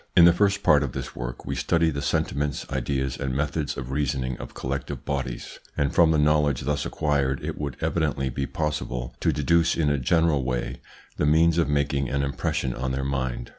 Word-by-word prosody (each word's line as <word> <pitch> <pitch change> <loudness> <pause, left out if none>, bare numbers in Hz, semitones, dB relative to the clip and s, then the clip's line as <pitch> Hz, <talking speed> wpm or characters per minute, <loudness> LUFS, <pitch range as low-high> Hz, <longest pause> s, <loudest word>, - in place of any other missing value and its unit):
In 85 - +9
the 85 - +7
first 100 +1 +2
part 75 -2 +5
of 70 -4 -2
this - - -6
work - - -6
we - - -2
studied 80 -1 +1
the 70 - -3
sentiments, 70 0 -1
ideas, 65 0 -1
and 65 -2 -2
methods 75 +1 -1
of 65 0 -5
reasoning 65 -3 -1
of - - -9
collective 70 +1 -4
bodies, 65 -4 -4 0.2
and 70 -1 +1
from 85 -2 +5
the 80 - +3
knowledge 75 -3 +3
thus 75 +2 -1
acquired 70 -3 0
it - - -3
would 70 -4 -4
evidently 75 -5 0
be 70 +2 -2
possible 65 -5 -3
to - - +2
deduce 80 +4 +2
in 75 -3 +2
a 70 - +1
general 80 +1 +2
way 60 0 -3 0.4
the 75 - +1
means 80 +2 +4
of 80 - +2
making 70 -2 0
an 70 +1 0
impression 70 -2 -1
on 65 +1 -3
their 65 0 -2
mind. 65 -3 -2
70 Hz, 200 wpm, -25 LUFS, 65-75 Hz, 0.4 s, In